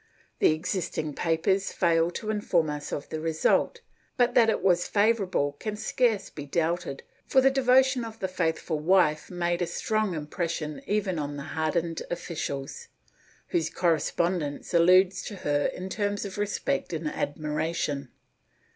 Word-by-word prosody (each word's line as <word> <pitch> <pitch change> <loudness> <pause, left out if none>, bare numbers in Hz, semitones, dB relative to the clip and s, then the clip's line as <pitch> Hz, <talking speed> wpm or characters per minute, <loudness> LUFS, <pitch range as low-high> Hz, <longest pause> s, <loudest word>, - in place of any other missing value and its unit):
The - - +5
existing 160 -2 -2
papers 170 +6 +1
fail 165 -1 +2
to 215 +5 -4
inform 175 -7 +1
us 150 0 -5
of 145 - -4
the 155 - -4
result, 165 - +1 0.4
but 245 -1 +3
that 230 -2 +5
it - - 0
was 175 -2 +3
favorable 205 -8 +2
can 215 -1 -3
scarce 220 -1 0
be 145 - -7
doubted, 165 -1 -1 0.2
for 265 - +4
the 270 +1 +5
devotion 265 -1 +4
of 225 -1 -7
the 190 - -1
faithful 165 -3 -1
wife 155 -2 +3
made 175 -1 -1
a 175 - +1
strong 215 -2 -1
impression 155 0 -3
even 200 -5 0
on 145 -1 -4
the 140 - -5
hardened 165 +1 -1
officials, 170 - -5 0.6
whose 345 -2 0
corre 170 -3 +2
spondence 170 -4 -2
alludes 185 +2 +5
to 205 - -7
her 145 -5 0
in 185 - -5
terms 205 +1 -2
of 200 0 -6
respect 210 +3 -1
and 160 -1 -2
admiration. 150 -2 -2
175 Hz, 150 wpm, -27 LUFS, 155-205 Hz, 0.6 s, The